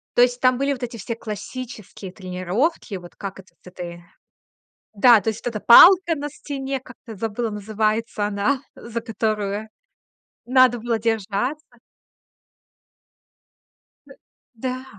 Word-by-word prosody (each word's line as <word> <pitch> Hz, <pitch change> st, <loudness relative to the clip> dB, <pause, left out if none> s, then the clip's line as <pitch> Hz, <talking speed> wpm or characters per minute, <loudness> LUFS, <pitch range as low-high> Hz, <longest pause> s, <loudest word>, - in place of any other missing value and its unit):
То -, -, +5 dB
есть 245 Hz, 0 st, +3 dB
там 255 Hz, 0 st, +3 dB
были 275 Hz, +2 st, 0 dB
вот 255 Hz, -, -8 dB
эти 235 Hz, -1 st, -5 dB
все 230 Hz, +2 st, -5 dB
классические 215 Hz, -2 st, -8 dB
тренировки. 190 Hz, -, -2 dB
Вот 175 Hz, -2 st, -10 dB
как 195 Hz, -2 st, -7 dB
это 185 Hz, -, -16 dB
с -, -, -16 dB
этой. 175 Hz, -1 st, -8 dB, 0.9 s
Да, 225 Hz, +1 st, +6 dB
то 225 Hz, -, 0 dB
есть 220 Hz, -, -6 dB
вот 240 Hz, -2 st, -3 dB
эта -, -, -1 dB
палка 345 Hz, +7 st, +8 dB
на 295 Hz, 0 st, -5 dB
стене, 275 Hz, -2 st, -5 dB
как-то 250 Hz, -2 st, -14 dB
я 215 Hz, -, -9 dB
забыла, 225 Hz, +2 st, -3 dB
называется 215 Hz, +1 st, -1 dB
она, 210 Hz, +7 st, 0 dB
за 235 Hz, -3 st, -6 dB
которую 215 Hz, -2 st, -2 dB, 0.8 s
надо 255 Hz, -1 st, +5 dB
было 230 Hz, 0 st, -1 dB
держаться. 225 Hz, +6 st, -2 dB, 2.4 s
Д -, -, -14 dB, 0.4 s
да. 255 Hz, +2 st, -4 dB
225 Hz, 135 wpm, -22 LUFS, 205-255 Hz, 2.4 s, палка